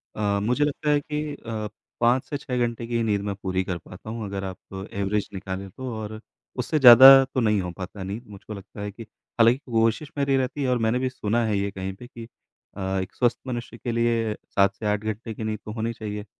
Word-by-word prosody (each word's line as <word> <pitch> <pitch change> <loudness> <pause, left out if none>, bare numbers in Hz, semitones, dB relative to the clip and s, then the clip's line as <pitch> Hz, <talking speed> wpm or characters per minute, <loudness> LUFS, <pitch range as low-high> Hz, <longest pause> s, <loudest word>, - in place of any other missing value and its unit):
अ, 100 -1 0
मुझे 125 +6 +2
लगता 150 +1 -2
है 145 -1 +4
कि 150 0 -4
अ, 110 -4 -5 0.3
5 120 +2 +3
से 145 - -4
6 125 -2 -4
घंटे 115 0 -4
की 120 -1 0
नींद 105 -3 +1
मैं 100 -1 -3
पूरी 95 -1 -2
कर 90 -1 -3
पाता 90 +5 -12
हूँ 110 -1 -4
अगर 100 -1 -4
आप 95 -1 -5 0.4
एवरेज 100 +1 -1
निकालें 95 0 -5
तो 130 +6 -7
और 110 0 -6 0.4
उससे 150 +5 0
ज़्यादा 125 0 +11 0.2
तो 130 0 -3
नहीं 105 -4 +2
हो 90 - -4
पाता 95 +2 -7
है 95 - -4
नींद, 105 +5 -5
मुझको 105 +1 -10
लगता 100 0 -10
है 105 - -4
कि 110 +4 -10 0.4
हालाँकि 115 +3 +5
कोशिश 115 +6 +1
मेरी 140 -1 +2
रहती 130 +2 -1
है 130 - +1
और 125 - +2
मैंने 120 +3 +2
भी 130 - 0
सुना 120 -2 -1
है 105 -2 +1
ये 100 0 -1
कहीं 95 0 -5
पे 120 +5 -11
कि 120 -2 -10 0.5
अ, - - -6 0.2
एक 95 - -7
स्वस्थ 120 -2 +2
मनुष्य 120 -2 -5
के 120 - -4
लिए 115 -1 +1 0.2
7 100 0 +4
से 110 - -8
8 105 0 0
घंटे 110 +1 -4
की 110 - -6
नींद 110 -1 -2
तो 105 - -5
होनी 115 +1 -2
चाहिए। 105 -2 -6
110 Hz, 235 wpm, -25 LUFS, 100-120 Hz, 0.5 s, ज़्यादा